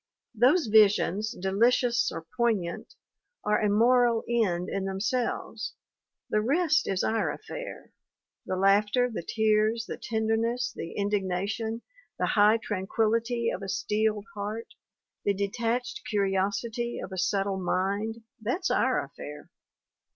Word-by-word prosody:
Those 260 +10 +4
visions, 210 -1 +4
delicious 235 +5 +2
or 160 - -6
poign 225 -7 +2
ant, 170 - -8 0.5
are 210 0 +2
a 210 - +2
moral 235 +2 +4
end 190 -7 +1
in 195 -1 -2
themselves. 220 +3 -2 0.6
The 215 - +3
rest 310 +6 +2
is 190 -1 0
our 225 0 +1
affair - - -8 0.5
the 185 - -3
laughter, 205 +6 +3
the - - -3
tears, 220 +3 +1
the - - -6
tenderness, 225 +2 0
the 165 - -6
in 200 0 0
dignation, 205 +4 -1 0.4
the - - 0
high 210 +1 +5
tranquillity 225 +3 0
of - - -5
a 195 - -5
steeled 210 +1 0
heart, 210 +3 -5 0.5
the 200 - +1
detached 230 +5 -2
curiosity 205 +4 -1
of - - -6
a 190 - -6
subtle 195 +1 0
mind 200 +5 -1 0.2
that's 255 - -1
our - - +2
affair - - -10
215 Hz, 130 wpm, -28 LUFS, 200-235 Hz, 0.6 s, high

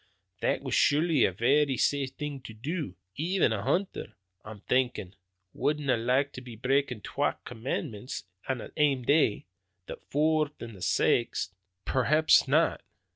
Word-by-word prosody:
"That - - 0
was - - -4
surely 150 -1 +4
a - - +1
varra 135 +7 +2
safe 140 +1 +1
thing 145 -2 -5
to 110 - -9
do. 145 - -4 0.2
Even 170 -4 +1
a 105 - -2
hunter, 175 - -2 0.3
I'm 105 -1 -10
thinkin', 125 -8 0 0.4
wouldna 145 -3 0
like 130 +5 +1
to 125 - -8
be 125 -2 -10
breakin' 130 0 0
twa - - -1
commandments 115 0 -4 0.3
in 130 - +1
the - - -9
ane 140 -4 +2
day 140 - +2 0.4
the - - -7
foorth 155 0 +1
and 115 -2 -8
the 95 - -13
saxth!" 95 +2 +1 0.3
"Perhaps 150 +4 +4
not. 155 +5 +2
135 Hz, 145 wpm, -28 LUFS, 115-150 Hz, 0.4 s, surely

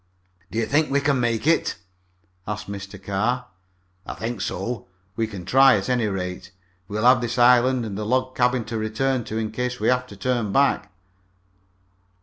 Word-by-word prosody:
"Do - - -6
you 115 - +1
think 150 +5 +2
we 140 - +2
can 140 -2 +1
make 115 0 0
it?" 165 +1 +2 0.7
asked 105 0 -4
Mr. 100 0 -7
Carr. 105 +6 -1 0.6
"I - - -7
think 110 +1 -4
so. 95 +3 -4 0.3
We 115 0 0
can 100 -5 -8
try, 135 0 +6
at 95 +3 -4
any 120 -3 +1
rate. 90 -2 -4 0.4
We'll 105 +3 -2
have 125 0 +6
this 120 +1 -3
island 125 0 +4
and 105 -3 -5
the 105 - -3
log 130 +3 0
cabin 125 -1 +1
to 115 0 -4
return 120 +3 -1
to 110 - -4
in 110 -1 -2
case 125 +2 -3
we 110 - +1
have 125 0 +1
to 100 - -12
turn 120 -1 -1
back." 140 -2 +2
115 Hz, 180 wpm, -23 LUFS, 105-125 Hz, 0.7 s, try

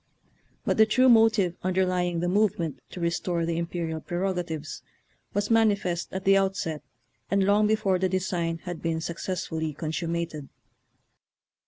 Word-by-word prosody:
But - - +1
the 220 0 +6
true 255 +4 +4
motive 220 -6 +4
underly 185 -1 +1
ing 170 -1 -2
the 175 - 0
movement 175 -7 +1
to - - -8
restore 170 0 -1
the 165 0 -1
imperial 165 -2 -3
prerogatives 175 -4 -3 0.5
was 205 +2 0
manifest 200 -6 +2
at 190 0 -4
the 195 0 +6
outset 190 -5 0 0.5
and 195 0 +2
long 205 +2 +4
before 200 -4 +1
the 185 0 +1
design 175 -3 -1
had 175 -2 -6
been 165 -1 -1
suc 165 +1 -5
cessfully 160 -5 -3
consummated. 165 -2 -3
180 Hz, 145 wpm, -26 LUFS, 165-195 Hz, 0.5 s, the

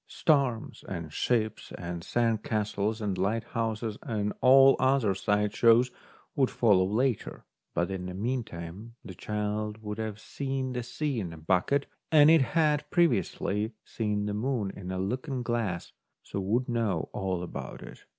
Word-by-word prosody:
Storms 135 -7 +1
and 85 -5 -5
ships 110 +1 -1
and 85 -1 -5
sand 115 0 +1
castles 105 +1 -1
and 100 -3 -2
lighthouses 110 +1 -1
and 105 -6 -2
all 135 +1 +8
the - - -7
other 130 -6 +3
side 105 +2 0
shows 120 +2 +5 0.4
would 135 -2 +3
follow 100 -6 +3
later; 120 +4 -1 0.3
but 85 +2 0
in 90 -1 -4
the 90 - -6
meantime 110 -2 -4
the 95 - -7
child 105 +2 -3
would 105 +1 -5
have 110 -2 -4
seen 135 +1 -3
the 125 - -2
sea 135 +2 -2
in 90 -5 -4
a 80 - -9
bucket, 95 - +1 0.3
as 150 -2 +7
it 160 -2 +7
had 150 +1 +1
previously 110 - +1
seen 105 -2 -2
the 105 - -2
moon 110 -2 -1
in 95 -2 -7
a 95 - -2
looking 125 +7 -2
glass, 115 -8 -2 0.3
so - - -5
would 110 +7 0
know 110 -9 0
all 95 -2 -2
about 90 - -7
it. - - -12
110 Hz, 160 wpm, -29 LUFS, 100-125 Hz, 0.4 s, all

